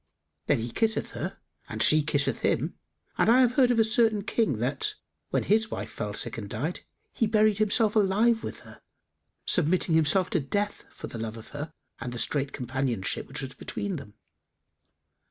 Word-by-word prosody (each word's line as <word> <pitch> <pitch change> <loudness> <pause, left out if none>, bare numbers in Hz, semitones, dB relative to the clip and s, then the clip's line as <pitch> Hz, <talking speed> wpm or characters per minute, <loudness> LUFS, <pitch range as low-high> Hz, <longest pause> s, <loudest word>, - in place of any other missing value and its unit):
'[FN#287] 75 0 -52
Then 145 - +3
he 115 +1 -4
kisseth 220 -1 0
her - - -5 0.3
and - - 0
she 155 0 +6
kisseth 145 -1 +1
him; - - 0 0.5
and - - +4
I 250 +3 +6
have 245 -2 +4
heard 255 -1 +4
of 245 - +2
a 225 - +6
certain 220 -2 +2
King 220 - 0
that, 130 +4 -1 0.3
when - - 0
his 220 +2 +2
wife - - -5
fell 105 -2 -4
sick 110 - 0
and 100 -2 -7
died, 150 - -3 0.3
he 225 - +1
buried 215 -1 +3
himself 215 0 +2
alive 220 +3 +3
with - - -6
her, - - -15 0.6
submitting 175 0 +2
himself 160 +4 +3
to 175 - +2
death, 205 +9 -2
for - - -9
the 115 - -7
love 115 0 -5
of 110 - -11
her 150 +2 -6 0.3
and 120 - -5
the 120 - -5
strait 140 +3 +1
companionship 125 -5 -2
which 140 +3 -6
was 135 - -6
between 200 -4 -4
them. 130 -7 -11
160 Hz, 190 wpm, -27 LUFS, -, 0.6 s, she